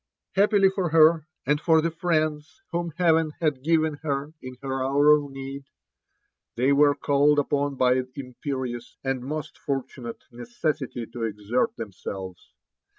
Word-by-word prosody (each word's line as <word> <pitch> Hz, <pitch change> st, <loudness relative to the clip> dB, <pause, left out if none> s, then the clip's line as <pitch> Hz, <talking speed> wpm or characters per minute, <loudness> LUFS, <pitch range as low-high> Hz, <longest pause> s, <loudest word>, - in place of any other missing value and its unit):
Happily 200 Hz, -1 st, +4 dB
for 190 Hz, -3 st, -1 dB
her, 160 Hz, 0 st, +5 dB, 0.2 s
and 150 Hz, +1 st, +1 dB
for 160 Hz, -2 st, +4 dB
the 165 Hz, +1 st, 0 dB
friends 155 Hz, -3 st, -1 dB
whom 170 Hz, 0 st, -1 dB
Heaven 165 Hz, -3 st, +3 dB
had 150 Hz, -5 st, 0 dB
given 160 Hz, -2 st, +1 dB
hei 145 Hz, 0 st, -3 dB
in 130 Hz, 0 st, -8 dB
her 135 Hz, -1 st, -2 dB
hour 140 Hz, +3 st, +4 dB
of 145 Hz, -1 st, -3 dB
need, 135 Hz, 0 st, -7 dB, 0.9 s
they 130 Hz, +4 st, +3 dB
were 145 Hz, 0 st, +5 dB
calledupon 145 Hz, 0 st, +2 dB
by 130 Hz, 0 st, +3 dB
imperious 125 Hz, -2 st, -5 dB
and 135 Hz, -1 st, -1 dB
most 150 Hz, +2 st, -5 dB
for 135 Hz, -2 st, -1 dB
tunate 120 Hz, -3 st, -9 dB
necessity 120 Hz, +1 st, -3 dB
to 115 Hz, +1 st, -9 dB
exert 110 Hz, +2 st, -1 dB
themselves. 95 Hz, -3 st, -7 dB
140 Hz, 140 wpm, -25 LUFS, 130-155 Hz, 0.9 s, her